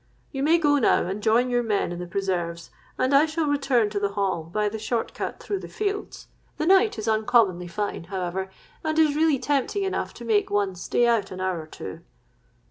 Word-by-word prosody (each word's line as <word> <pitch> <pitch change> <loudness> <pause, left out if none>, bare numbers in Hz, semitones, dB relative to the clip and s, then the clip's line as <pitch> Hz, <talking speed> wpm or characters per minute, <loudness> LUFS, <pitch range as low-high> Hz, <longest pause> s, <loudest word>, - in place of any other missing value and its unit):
You 270 - -4
may 315 +4 +4
now 330 - -5 0.2
go 235 - +3
and 200 +3 -4
join 235 +4 +3
your 245 0 +2
men 210 -6 0
in 175 - -5
the 180 - -5
preserves; 175 -3 -3 0.3
and 260 +2 +1
I 285 +3 +6
shall 315 0 -1
return 270 -7 +1
to 205 - -1
the 200 0 -1
Hall, 195 -4 0
by 210 +6 -1
the 220 +1 -4
short 225 +2 -2
cut - - -5
through 400 - -3
the - - -8
fields. 410 -1 -4 0.3
The 310 - -1
night 385 - +4
is 215 - -4
uncommonly 215 -5 +2
fine, 175 0 -4
however, 190 0 -3 0.3
and 315 0 -1
is 310 -2 +4
really 310 -2 +3
tempting 285 +9 0
enough 385 - -2
to 235 - -9
make 215 -2 +2
one 205 -2 +1
stay 180 +6 0
out 230 -4 +2
an 185 - -8
hour 185 -3 -1
or 155 - -12
two.' 95 -11 -8
220 Hz, 215 wpm, -25 LUFS, 190-285 Hz, 0.3 s, I